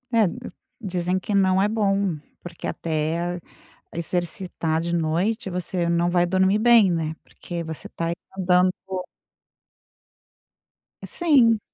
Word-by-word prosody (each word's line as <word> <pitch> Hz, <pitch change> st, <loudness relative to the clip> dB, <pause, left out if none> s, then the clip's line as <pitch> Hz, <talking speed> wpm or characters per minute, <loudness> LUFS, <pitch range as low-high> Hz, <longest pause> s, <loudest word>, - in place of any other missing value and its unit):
É 225 Hz, -2 st, +5 dB, 0.6 s
dizem 180 Hz, -2 st, -1 dB
que 205 Hz, -, -4 dB
não 190 Hz, -1 st, +4 dB
é 200 Hz, -, +3 dB
bom 200 Hz, -5 st, +1 dB, 0.3 s
porque 175 Hz, -1 st, -7 dB
até 165 Hz, +2 st, -2 dB, 0.5 s
exercitar 170 Hz, -1 st, -2 dB
de 170 Hz, +1 st, -2 dB
noite 175 Hz, +7 st, 0 dB
você 180 Hz, -1 st, -2 dB
não 170 Hz, +1 st, +2 dB
vai 175 Hz, 0 st, +3 dB
dormir 190 Hz, +3 st, +2 dB
bem, 225 Hz, -4 st, +6 dB
né, 160 Hz, -2 st, -1 dB
porque 170 Hz, -1 st, -7 dB
você 160 Hz, -1 st, -7 dB
está 165 Hz, -, -4 dB
aí 170 Hz, -, 0 dB, 0.2 s
mandando 180 Hz, 0 st, +3 dB, 2.3 s
Sim. 260 Hz, -10 st, +4 dB
180 Hz, 120 wpm, -24 LUFS, 170-195 Hz, 2.3 s, bem